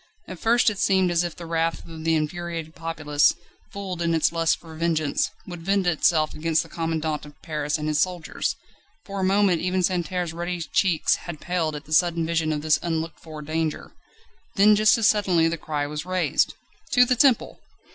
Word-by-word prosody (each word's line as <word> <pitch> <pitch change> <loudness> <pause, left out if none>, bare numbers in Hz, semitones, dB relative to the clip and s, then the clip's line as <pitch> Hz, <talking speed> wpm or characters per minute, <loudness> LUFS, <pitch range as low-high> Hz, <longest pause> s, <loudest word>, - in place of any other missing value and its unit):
At 185 -2 -8
first 235 0 +3
it 200 - -7
seemed 190 -3 +3
as 175 0 +2
if 175 -2 -4
the 175 - -9
wrath 165 0 -1
of 160 -1 -9
the 165 0 +3
infuriated 165 +1 -3
populace, 155 -3 +1 0.4
fooled 190 -3 -5
in 165 -1 +1
its 160 - +2
lust 165 -1 +1
for 165 -1 -13
vengeance, 160 -2 0 0.2
would 175 -2 -8
vent 195 +2 +1
itself 160 -2 +2
against 160 +1 0
the - - -15
commandant 160 -2 -2
of 145 0 -14
Paris 150 -1 -2
and 150 0 -4
his 150 -1 +1
soldiers; 180 -3 -2 0.5
for 200 -1 -5
a - - -1
moment 190 -2 +3
even 185 +1 0
Santerre's 180 -1 -1
ruddy 175 +1 -3
cheeks 165 +1 +1
had 165 -3 -6
paled 165 -3 -2
at 150 0 -8
the 155 - -6
sudden 170 0 +3
vision 165 -1 0
of 150 -1 -3
this 155 -2 +3
unlooked 165 -1 -3
for 155 -2 -9
danger. 155 +1 -3 0.6
Then 210 +1 +6
just 215 +3 +5
as 225 -2 +3
suddenly 185 -6 +3
the 165 - -1
cry 150 -2 -2
was 150 +1 -5
raised. 185 0 0 0.4
"To 250 - +6
the 250 0 +2
Temple!" 255 -1 +2
165 Hz, 195 wpm, -24 LUFS, 155-185 Hz, 0.6 s, Then